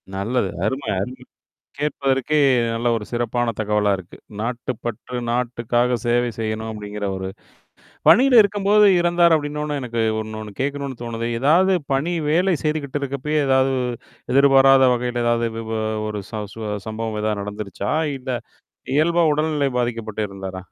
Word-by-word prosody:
நல்லது. 100 +1 -1 0.2
அருமை, 130 +5 -2
அருமை! 100 +7 -3 0.7
கேட்பதற்கே 140 0 0 0.4
நல்ல 115 +1 -1
ஒரு 110 -2 -4
சிறப்பான 120 0 -1
தகவலா 105 -1 +1
இருக்கு. 95 -1 -12 0.2
நாட்டு 120 +3 -3
பற்று, 120 +2 -5
நாட்டுக்காக 120 0 0
சேவை 120 +1 +2
செய்யணும் 110 0 -3
அப்படிங்கிற 105 -1 -6
ஒரு 95 0 -4 0.8
பணியில 255 0 +7
இருக்கும்போது 205 +1 +3
இறந்தார் 175 -1 +4
அப்படின்னொன்னே 150 -1 -3
எனக்கு 120 -2 -3 0.2
இன்னொண்ணு 110 -1 -7
கேட்கணும்னு 140 -2 -3
தோணுது. 115 0 -4
ஏதாவது 180 +7 +4 0.2
பணி, 155 +6 0 0.2
வேலை 180 +4 +3
செய்துகிட்டு 150 -2 -1
இருக்கப்பயே, 140 +3 -2
ஏதாவது 130 0 +3 0.6
எதிர்பாராத 135 -1 +6
வகையில, 120 0 -2
ஏதாவது 120 0 +2
இது 115 0 -6 0.4
ஒரு 105 -1 -4
சு 110 - -4 0.5
சம்பவம் 110 0 -3
ஏதாவது 105 -1 -1
நடந்துருச்சா? 100 -1 -4 0.3
இல்ல 130 +1 -6 0.6
இயல்பா 170 +3 +3
உடல்நிலை 150 -2 0
பாதிக்கப்பட்டு 110 -3 -2
இறந்தாரா? 95 -1 -7
125 Hz, 125 wpm, -21 LUFS, 110-145 Hz, 0.8 s, பணியில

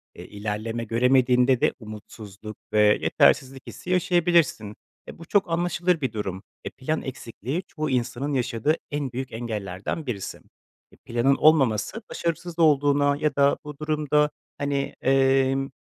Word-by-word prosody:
Eee, - - -10
ilerleme 110 +3 -4
göremediğinde 125 +2 +3
de - - +3
umutsuzluk 105 -1 -10 0.2
ve 105 - +3 0.2
yetersizlik 135 0 +2
hissi 180 - -9
yaşayabilirsin. 175 - +2 0.3
Eee, - - -10
bu 165 - -11
çok 195 +1 +1
anlaşılır 175 0 0
bir 130 -4 -2
durum. 95 -3 -4 0.2
Eee, - - -4
plan 155 +5 -2
eksikliği 130 - -5
çoğu 155 -1 -4
insanın 130 +2 -1
yaşadığı 130 +3 0 0.2
en 145 -3 -2
büyük 130 +2 -5
engellerden 110 - -4
birisi. 110 -7 -5 0.5
Eee, - - -20
planın 120 +4 +2
olmaması 145 - +3
başarısız 170 0 -4
olduğuna 145 -2 +4
ya 150 -2 -1
da 140 0 +3
bu 150 -1 -8
durumda, 150 -1 +1 0.3
hani, 140 -1 -2
emm, 135 0 +2
135 Hz, 135 wpm, -25 LUFS, 115-150 Hz, 0.5 s, olduğuna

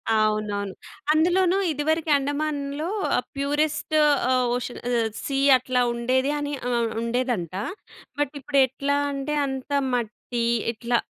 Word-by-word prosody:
అవునవును. 210 -2 0 0.4
అందులోను 355 +4 +3
ఇదివరకు 315 +2 0
అండమాన్‌లో 290 +2 -2 0.3
ఆ - - +3 0.2
ప్యూరెస్ట్ 295 +2 0 0.4
ఆహ్, 255 -1 +2
ఓషన్ 250 0 -5
ఆహ్, 230 -2 +2 0.2
సీ 275 -1 -1 0.2
అట్లా 250 0 0
ఉండేది 260 +4 +1
అని 290 0 -3 0.2
ఆహ్, 235 -1 +1
ఉండేదంట. 235 -7 -1 0.7
బట్ 290 0 0
ఇప్పుడు 280 -1 +1
ఎట్లా 280 +2 -1
అంటే, 275 +2 -3
అంత 265 +1 -5 0.2
మట్టి 235 0 -2 0.3
ఇట్లా 235 +1 0
270 Hz, 120 wpm, -25 LUFS, 235-290 Hz, 0.7 s, అందులోను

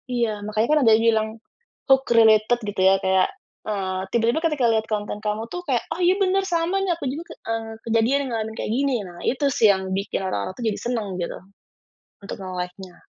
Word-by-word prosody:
iya 235 -2 +1 0.2
makanya 215 +2 0
kan 305 - +5
ada 225 - +6
yang 225 +1 +4
bilang, 220 -1 +2 0.6
hook 270 0 +6
related 220 0 +5
gitu 200 -2 -3
ya 195 - +5
kayak, 190 0 +3 0.4
eee, 190 -3 -2
tiba-tiba 235 +5 +2
ketika 295 -6 +1
lihat 220 0 +1
konten 210 0 -3
kamu 210 +1 -3
tuh 355 - -4
kayak 250 -4 +1
oh - - -7
iya 360 - +5
benar 390 +1 +2
sama 335 +3 +1
nih 360 -3 +1
aku 330 - -6
juga 310 +4 -5
ke, - - -7 0.2
eee, 225 0 -2 0.2
kejadian 230 +4 +2
yang 270 - -4
ngalamin 220 0 -4
kayak - - -3
gini 280 -1 +1
nah 175 -1 -12
itu 270 +3 0
sih 220 - +6
yang 190 0 -3
bikin 195 0 -3
orang-orang 100 - -3
tuh 250 - -8
jadi 210 - -3
senang 235 -3 -1
gitu, 175 - -3 0.9
untuk 195 - -6
nge-like-nya. 180 0 -6
225 Hz, 205 wpm, -23 LUFS, 200-265 Hz, 0.9 s, ada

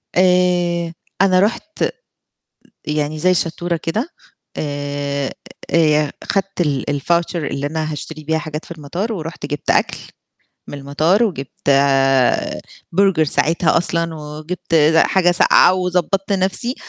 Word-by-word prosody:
آآ 180 -2 +2 0.3
أنا 185 -2 +4
رُحت 230 +10 -1 1.0
يعني 150 0 -2
زي 185 +4 +3
الشطورة 170 0 -1
كده 215 - -3 0.5
آآ 145 -1 -3 0.4
آآ - - +1 0.3
ي - - -9
خدت 195 -1 -1
ال 145 -5 0 0.2
الVoucher 170 +2 0
اللي 145 -3 -2
أنا 155 0 -3
هاشتري 155 +1 -7
بيها 160 +1 0
حاجات 155 0 -6
في - - -13
المطار، 170 +8 -4
ورُحت 165 -5 -6
جِبت 145 -1 -5
أكل - - +2 0.7
من 145 - -7
المطار 155 +10 +2
وجِبت 140 - -3 1.2
برجر 190 -3 +3
ساعتها 155 +3 +2
أصلًا 170 -1 -1
وجِبت 155 +3 -6 0.2
حاجة 175 +1 +4
ساقعة 180 - +5
وضبّطت 185 +2 -1
نفسي 195 +6 0
165 Hz, 120 wpm, -19 LUFS, 150-185 Hz, 1.2 s, ساقعة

